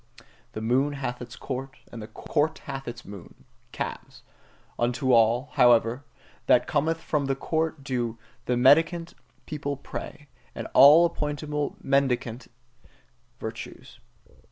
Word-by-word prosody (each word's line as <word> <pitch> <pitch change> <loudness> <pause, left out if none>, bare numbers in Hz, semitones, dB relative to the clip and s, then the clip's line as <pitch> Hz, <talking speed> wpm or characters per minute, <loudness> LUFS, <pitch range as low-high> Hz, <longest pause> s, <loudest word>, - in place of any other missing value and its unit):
The 110 - -5
moon 130 +6 +1
hath 130 -3 -4
its 120 -1 -8
court, 135 0 -6
and 115 - -8
the 105 - -8
court 150 +7 -1
hath 135 -1 -6
its 120 0 -7
moon 100 -4 -12 0.3
calves: - - -6 0.6
unto 125 +2 +1
all, 120 +3 +3
however, 120 +1 +4 0.4
that - - +5
cometh 165 +3 0
from 150 -3 -1
the 135 - 0
court 160 +1 -2
do 120 -4 -2 0.3
the 125 - 0
mendicant 165 +6 +4 0.3
people 145 -2 -4
pray, 145 +1 -8 0.3
and - - -5
all 155 +5 +8
appointable 150 -2 -3
mendicant 130 -3 0 0.9
virtues. 110 +1 -8
135 Hz, 125 wpm, -26 LUFS, 120-150 Hz, 0.9 s, all